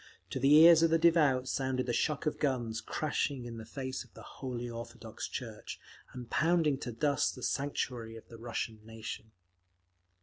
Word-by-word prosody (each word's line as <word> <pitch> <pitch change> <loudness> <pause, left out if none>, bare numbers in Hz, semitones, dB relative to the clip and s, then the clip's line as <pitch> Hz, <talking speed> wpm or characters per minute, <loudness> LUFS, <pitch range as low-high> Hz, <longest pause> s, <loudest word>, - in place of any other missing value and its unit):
To - - -2
the 135 +3 +6
ears 165 +1 +9
of 165 - +5
the 165 - +4
devout 155 -6 +4
sounded 130 -1 -1
the 120 - -1
shock 150 +6 0
of 150 - -1
guns 120 -6 -1
crashing 145 -4 -2
in 115 -1 -7
the 110 -1 -9
face 130 +1 -4
of 120 - -24
the - - -11
Holy 125 -2 -5
Orthodox 115 0 -7
Church, - - -7 0.3
and 125 -2 -8
pounding 155 -1 +2
to 120 - -5
dust 140 +5 +1
the 125 - -10
sanctuary 125 -5 -2
of 115 - -12
the 115 - -12
Russian 115 -1 -4
nation…. 110 0 -7
130 Hz, 175 wpm, -32 LUFS, 115-150 Hz, 0.3 s, ears